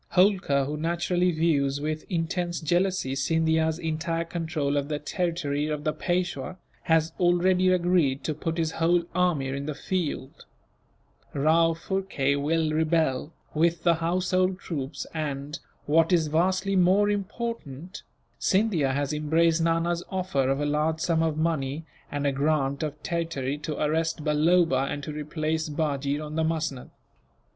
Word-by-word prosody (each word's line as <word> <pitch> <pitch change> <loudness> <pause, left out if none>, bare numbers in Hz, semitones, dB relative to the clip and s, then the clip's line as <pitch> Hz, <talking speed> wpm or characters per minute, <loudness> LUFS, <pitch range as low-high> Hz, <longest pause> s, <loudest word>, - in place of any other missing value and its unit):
Holkar, 180 -8 +3
who 150 +2 -3
naturally 175 +3 +1
views 145 -4 +1
with 155 +1 -3
intense 175 0 -1
jealousy 175 -3 0
Scindia's 160 +2 +1
entire 165 0 -2
control 160 -4 -2
of 140 -1 0
the 150 -1 -2
territory 150 -2 -2
of 150 -1 -3
the 155 - 0
Peishwa, 175 -2 -2 0.3
has 160 0 +3
already 180 +1 +3
agreed 175 -7 +2
to 155 - -1
put 165 +2 -3
his 160 -1 0
whole 170 +2 +2
army 170 -7 +1
in 140 +2 -4
the 155 - -3
field; 155 -5 -3 0.9
Rao 165 +3 +3
Phurkay 165 -6 -1
will 155 +2 0
rebel, 155 -3 +1 0.2
with 165 +1 +1
the 170 - +5
household 185 +2 +1
troops 145 -5 -5
and, 150 -1 -4 0.3
what 165 +4 +3
is 165 -4 +3
vastly 185 +5 +1
more 190 +3 +4
important, 195 - -5 0.4
Scindia 185 -9 +2
has 140 +1 -1
embraced 160 +2 +2
Nana's 165 +1 +1
offer 180 -9 0
of 135 +1 +1
a 145 - 0
large 155 +2 0
sum 165 0 +1
of 160 -2 0
money, 155 -2 -1 0.3
and 145 0 -2
a 140 - +3
grant 140 -1 0
of 150 -1 -4
territory, 165 -6 -2
to 150 0 -4
arrest 160 +1 0
Balloba, 150 -2 +3
and 145 - -4
to 150 - -5
replace 155 +1 -2
Bajee 145 -1 -1
on 155 +1 -6
the 160 - +2
musnud. 160 -5 -2
160 Hz, 145 wpm, -26 LUFS, 145-175 Hz, 0.9 s, the